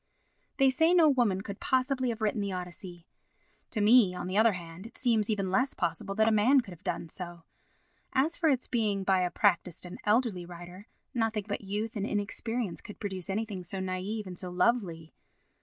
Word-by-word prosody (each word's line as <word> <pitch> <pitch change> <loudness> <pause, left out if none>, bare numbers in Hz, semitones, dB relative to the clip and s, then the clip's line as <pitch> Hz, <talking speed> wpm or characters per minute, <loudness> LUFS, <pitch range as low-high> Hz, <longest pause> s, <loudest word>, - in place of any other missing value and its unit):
They 270 -1 +5
say 320 +6 +3
no 330 -3 +7
woman 235 -9 +2
could 200 0 -7
possibly 260 0 +1
have 230 -1 -4
written 215 0 0
the 200 -1 -2
Odyssey. 180 -1 -7 0.6
To 215 - -1
me, 210 -3 +6
on - - -4
the 185 +1 -3
other 220 +1 +5
hand, 175 +2 -8
it - - -16
seems 225 -4 +2
even 195 -3 0
less 255 +8 +1
possible 180 +3 -2
that 220 +1 +3
a - - +4
man 240 +6 +5
could 215 -6 -12
have 175 - -13
done - - -3
so. 175 0 -8 0.7
As 285 +5 +2
for 325 - +2
its 260 -3 +1
being 210 -5 0
by 190 -1 +3
a 180 - +1
practised 180 -3 +1
and 180 - -8
elderly 210 -4 +2
writer, 175 +3 -10 0.3
nothing 225 -4 0
but 205 - -3
youth 210 +3 -3
and 205 0 -2
inexperience 210 0 -3
could 210 - -11
produce 190 -4 -5
anything 200 -2 -3
so 185 +3 -5
naïve 190 +3 -3
and 180 -2 -7
so 180 - -5
lovely. 180 -5 0
205 Hz, 195 wpm, -30 LUFS, 185-230 Hz, 0.7 s, no